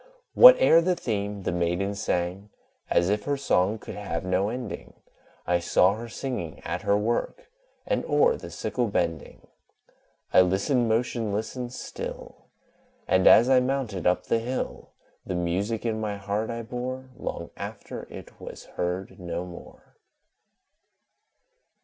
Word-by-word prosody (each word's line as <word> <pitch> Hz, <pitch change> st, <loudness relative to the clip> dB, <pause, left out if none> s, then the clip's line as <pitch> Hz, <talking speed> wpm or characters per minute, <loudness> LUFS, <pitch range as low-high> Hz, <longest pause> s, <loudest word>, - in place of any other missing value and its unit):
Whate'er -, -, +9 dB
the 180 Hz, +1 st, +1 dB
theme, 100 Hz, -, -3 dB
the -, -, -1 dB
Maiden 90 Hz, +3 st, 0 dB
sang 95 Hz, 0 st, -2 dB, 0.4 s
As 85 Hz, -, +3 dB
if 105 Hz, 0 st, -1 dB
her 145 Hz, 0 st, 0 dB
song 105 Hz, -6 st, +1 dB
could -, -, -9 dB
have 100 Hz, -4 st, -4 dB
no 95 Hz, +2 st, +1 dB
ending; 120 Hz, -2 st, -6 dB, 0.5 s
I 90 Hz, 0 st, +2 dB
saw 90 Hz, +2 st, +3 dB
her 115 Hz, +2 st, -7 dB
singing 115 Hz, -, -5 dB
at -, -, -3 dB
her 100 Hz, -, +2 dB
work, 120 Hz, -, -2 dB, 0.3 s
And -, -, 0 dB
o'er 475 Hz, +1 st, +3 dB
the -, -, -9 dB
sickle 125 Hz, -2 st, -2 dB
bending; 85 Hz, -6 st, -3 dB, 0.9 s
I -, -, +8 dB
listened, 100 Hz, +7 st, +1 dB
motionless 110 Hz, -2 st, -1 dB
and 125 Hz, -1 st, -5 dB
still; -, -, -8 dB, 0.6 s
And, 95 Hz, 0 st, +4 dB
as 120 Hz, -, +8 dB
I 130 Hz, -1 st, +6 dB
mounted 125 Hz, -9 st, -1 dB
up 90 Hz, -, +2 dB
the 115 Hz, -, +1 dB
hill 125 Hz, +3 st, -4 dB, 0.3 s
The 95 Hz, -, -4 dB
music 95 Hz, +7 st, -1 dB
in 110 Hz, -1 st, -1 dB
my 105 Hz, -2 st, -3 dB
heart 100 Hz, +2 st, -2 dB
I 115 Hz, 0 st, -4 dB
bore, 130 Hz, +2 st, -5 dB
Long -, -, -6 dB
after -, -, -7 dB
it -, -, -12 dB
was -, -, -9 dB
heard 90 Hz, +3 st, -3 dB
no 85 Hz, 0 st, -4 dB
more. 90 Hz, -1 st, -13 dB
105 Hz, 145 wpm, -26 LUFS, 90-125 Hz, 0.9 s, Whate'er